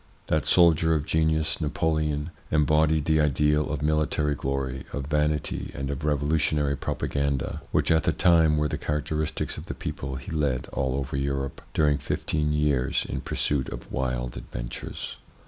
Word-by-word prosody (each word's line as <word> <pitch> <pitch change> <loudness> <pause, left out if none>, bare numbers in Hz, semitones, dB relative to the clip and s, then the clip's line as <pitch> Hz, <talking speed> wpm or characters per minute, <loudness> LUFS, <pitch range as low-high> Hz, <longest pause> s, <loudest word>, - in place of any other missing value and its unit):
That 80 -2 +1
soldier 80 -2 +5
of 75 -2 -1
genius, 80 0 +1
Napoleon, 75 0 0 0.2
embodied 75 0 +3
the 80 -1 +3
ideal 75 +1 +2
of 75 -1 -2
military 75 -1 +1
glory, 65 -1 -2
of 70 -2 -3
vanity, 75 0 -1
and 70 0 -3
of 70 +1 -5
revolutionary 75 -1 +1
propaganda, 70 0 -2
which - - +2
at 80 0 +5
the - - +4
time 80 -4 +4
were 75 0 +2
the - - -3
characteristics 75 +1 -2
of - - -9
the - - -5
people 65 0 -5
he 65 +3 -7
led 70 -6 0
all 65 -2 0
over 70 -1 -3
Europe 70 -1 -2
during 75 -2 +3
fifteen 75 +2 -1
years 75 -4 +1
in - - -3
pursuit 70 -3 -1
of - - -8
wild 60 -2 -2
adventures. - - -6
75 Hz, 155 wpm, -26 LUFS, 70-75 Hz, 0.2 s, soldier